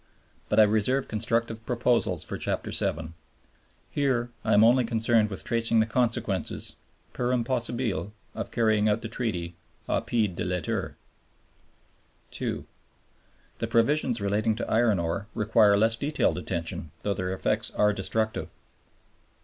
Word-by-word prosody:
But - - +3
I - - +9
reserve 110 +6 +2
constructive 115 +1 -1
proposals 120 -2 +1
for - - -5
Chapter - - -2
VII. 80 +1 -1 0.8
Here 125 -4 0
I - - +3
am 105 - +6
only 125 +3 +5
concerned 115 -1 +2
with 95 -6 -6
tracing 115 -1 +1
the 110 - +4
consequences, 110 -6 -1 0.4
per 125 0 -1
impossibile, 120 -6 -1 0.2
of - - -5
carrying 110 -2 +2
out 105 +2 0
the - - -3
Treaty 100 -8 -3 0.3
au - - +1
pied 105 -6 0
de - - -3
lettre. 90 -2 -2 1.4
(2) - - -3 0.9
The - - -1
provisions 120 0 +2
relating 105 +2 +1
to 120 - -4
iron 110 -2 +3
ore 85 +4 -2
require 105 -1 +4
less 110 +2 +3
detailed 140 - 0
attention, 85 -3 -3
though 100 - 0
their 90 -1 -3
effects 95 - 0
are 105 0 +2
destructive. 110 +3 -2
110 Hz, 135 wpm, -27 LUFS, 100-120 Hz, 1.4 s, I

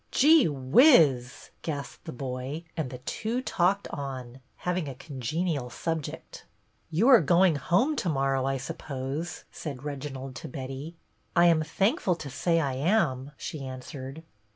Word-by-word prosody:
" - - -42
Gee 305 - +6
whiz! 135 - +4
" - - -40
gasped 145 -5 -5
the - - -5
boy; 130 +4 -5
and 155 -6 -2
the 125 - -7
two 220 - -3
talked 200 -5 +1
on, 130 -3 -6 0.2
having 180 -4 -2
a 135 - -7
congenial 145 +1 -3
subject. 160 +3 -5 0.5
"You 175 +9 +2
are 250 -5 +9
going 175 +2 +4
home 195 - +2
to 180 - 0
morrow, 135 -2 +1
I 135 0 0
sup 135 - -6
pose," 140 +4 -4
said 140 -4 -7
Reginald 135 -2 -5
to - - -7
Betty. 135 +5 -6 0.2
" - - -41
I 170 - +6
am 165 -2 +5
thankful 195 - +1
to 145 -4 -8
say 165 +5 +1
I 140 -4 0
am," 145 -3 +1
she 150 -3 -6
answered. 130 +3 -7
145 Hz, 160 wpm, -28 LUFS, 130-175 Hz, 0.5 s, are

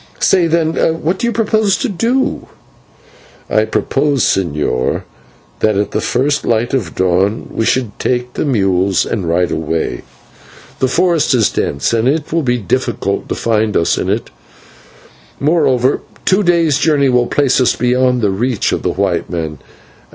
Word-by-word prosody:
Say, 180 -3 +3
then, 165 -1 +1 0.3
what 175 +5 0
do 235 - 0
you - - 0
propose 215 -3 +1
to - - -1
do?" 230 +7 -1 1.0
"I 110 0 +3
propose, 140 +4 0
señor, 75 -8 0 0.6
that 110 -2 +1
at 105 0 -1
the - - -1
first 140 +4 0
light 115 +2 0
of 110 -12 -2
dawn 95 +4 0
we 115 - -1
should 120 -5 -1
take 125 0 -1
the - - -2
mules 95 -7 +1
and 95 -7 -3
ride 90 +1 +1
away. 80 +1 -2 0.8
The 130 - +2
forest 165 -1 +2
is 115 -4 +2
dense, 70 +10 -1
and 115 +1 +1
it 150 +3 -1
will 165 - +2
be 125 -4 0
difficult 100 -7 -2
to - - -1
find 110 -2 0
us 85 - +2
in - - -2
it, - - -2 1.1
moreover 135 -4 +2 0.2
two 190 +2 +3
days' 170 -6 +2
journey 145 -4 +2
will 125 -1 +2
place 135 -2 +2
us 125 - +2
beyond 125 0 +1
the 100 - +2
reach 115 +3 -1
of - - -2
white - - 0
men. 80 -4 -4
125 Hz, 160 wpm, -15 LUFS, 100-155 Hz, 1.1 s, Say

